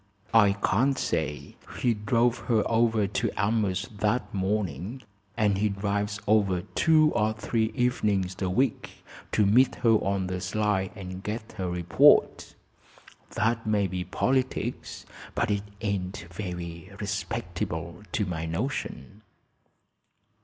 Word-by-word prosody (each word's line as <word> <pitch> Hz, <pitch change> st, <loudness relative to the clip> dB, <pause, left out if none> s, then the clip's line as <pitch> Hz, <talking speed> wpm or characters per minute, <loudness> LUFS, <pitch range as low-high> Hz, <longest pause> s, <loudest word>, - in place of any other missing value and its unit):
"I 105 Hz, -3 st, +6 dB
can't 120 Hz, +7 st, +1 dB
say. 75 Hz, -, -2 dB, 0.2 s
He 120 Hz, -, +2 dB
drove 115 Hz, +3 st, +1 dB
her 110 Hz, -3 st, +3 dB
over 115 Hz, -2 st, +2 dB
to 100 Hz, -, -1 dB
Elmhurst 105 Hz, +1 st, 0 dB
that 105 Hz, +1 st, 0 dB
morning, 100 Hz, -, -2 dB, 0.3 s
and 105 Hz, -3 st, +2 dB
he 105 Hz, +1 st, +2 dB
drives 100 Hz, +1 st, -2 dB
over 100 Hz, -4 st, +3 dB
two 155 Hz, +8 st, +3 dB
or 110 Hz, -2 st, +1 dB
three 110 Hz, 0 st, -1 dB
evenings 105 Hz, -7 st, +1 dB
a 95 Hz, -, 0 dB
week 125 Hz, +6 st, -1 dB, 0.3 s
to 105 Hz, -, +3 dB
meet 125 Hz, +7 st, +4 dB
her 115 Hz, -, +6 dB
on 100 Hz, -3 st, +1 dB
the 90 Hz, 0 st, -3 dB
sly 100 Hz, -1 st, 0 dB
and 95 Hz, -1 st, -7 dB
get 110 Hz, +2 st, -5 dB
her 90 Hz, -1 st, -1 dB
report. 85 Hz, -1 st, +3 dB, 0.8 s
That 115 Hz, 0 st, 0 dB
may 105 Hz, -2 st, +2 dB
be 90 Hz, -1 st, -3 dB
politics, 130 Hz, +8 st, -2 dB, 0.3 s
but 115 Hz, -, +1 dB
it 100 Hz, -1 st, +1 dB, 0.2 s
ain't 95 Hz, -4 st, -3 dB
very 90 Hz, -3 st, -6 dB
respectable, 85 Hz, -4 st, -4 dB
to 105 Hz, -, +1 dB
my 80 Hz, -3 st, -3 dB
notion." 100 Hz, -, -4 dB
105 Hz, 125 wpm, -27 LUFS, 95-110 Hz, 0.8 s, I